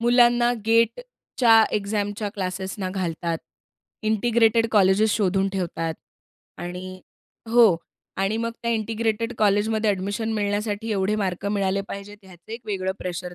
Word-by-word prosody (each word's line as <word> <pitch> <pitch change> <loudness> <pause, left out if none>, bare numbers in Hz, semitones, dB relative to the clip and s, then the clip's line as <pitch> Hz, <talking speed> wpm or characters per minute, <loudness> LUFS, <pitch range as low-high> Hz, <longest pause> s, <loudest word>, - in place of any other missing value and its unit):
मुलांना 240 0 +4
G-A-T-Eच्या 230 - +3
एक्झामच्या 205 +1 -2
क्लासेसना 190 0 -4
घालतात. 170 -3 -2 0.7
Integrated 225 +1 +3
colleges 205 +1 +4
शोधून 195 -1 +1
ठेवतात. 165 -3 -2 0.6
आणि 185 +1 -7 0.5
हो, 230 -7 +6 0.4
आणि 195 +3 0
मग 230 0 -1
त्या 235 - 0
इंटिग्रेटेड 225 +1 -1
कॉलेजमध्ये 215 +1 +2
एडमिशन 205 +4 -2
मिळण्यासाठी 205 +1 -2
एवढे 200 +1 0
मार्क 190 -1 -2
मिळाले 200 -1 0
पाहिजेत 205 +1 -8
ह्याचं 185 +3 -13
एक 230 - -6
वेगळं 190 -2 -2
प्रेशर 180 0 -5
205 Hz, 115 wpm, -24 LUFS, 190-225 Hz, 0.7 s, हो